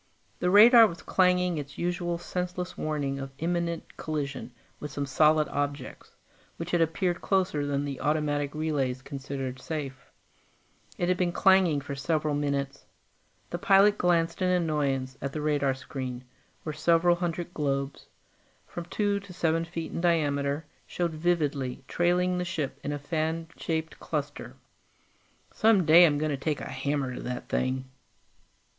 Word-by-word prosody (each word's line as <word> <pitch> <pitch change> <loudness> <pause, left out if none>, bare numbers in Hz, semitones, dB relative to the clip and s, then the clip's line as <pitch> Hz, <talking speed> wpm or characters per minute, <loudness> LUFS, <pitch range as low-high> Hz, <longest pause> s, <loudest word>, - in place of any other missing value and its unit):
The 180 - +1
radar 225 +4 +9
was 170 -4 -9
clanging 180 -3 +2
its 145 -1 -8
usual 175 0 -1
senseless 180 +1 -4
warning 145 -3 -2
of 135 0 -5
imminent 170 +1 -2
collision 145 -4 -4 0.3
with 150 - -6
some 140 +1 -3
solid 155 +3 +3
objects, 145 0 -4 0.4
which 165 +1 -5
had 175 - +2
approached 170 +2 0
closer 180 -7 0
than 140 0 -1
the 140 -2 -5
automatic 145 -1 0
relays 140 -5 -1
considered 135 -2 -5
safe. 135 -5 -6 0.9
It 175 - 0
had 180 0 +2
been 180 -1 +1
clanging 185 -5 +4
for 140 - -6
several 150 +2 -1
minutes. 140 -1 -2 0.6
The - - -3
pilot 200 +2 +5
glanced 170 -1 +1
in 185 - +2
annoyance 145 -7 0
at 140 0 -4
the 155 - -3
radar 145 -3 +1
screen, 130 -1 -6 0.4
where 155 - -4
several 170 +3 +3
hundred 175 0 -3
globes 140 -2 -2 0.6
from 175 - -7
two 205 +2 0
to 200 -2 -12
seven 165 -1 0
feet 165 -1 -5
in - - -3
diameter 145 -3 +1 0.2
showed 175 -1 -1
vividly, 150 -6 -1
trailing 180 +1 +1
the - - 0
ship 155 -6 -3
in 145 - -2
a 145 - -2
fan 160 +2 -2
shaped 160 -1 -3
cluster. - - -4 1.0
"Some 215 -5 +4
day 170 +3 +8
I'm 145 -2 +1
going 155 +1 -1
to 140 - -1
take 150 +2 -2
a - - -6
hammer 135 0 -2
to - - -6
that 125 0 -5
thing." 130 0 -1
155 Hz, 150 wpm, -28 LUFS, 140-175 Hz, 1.0 s, radar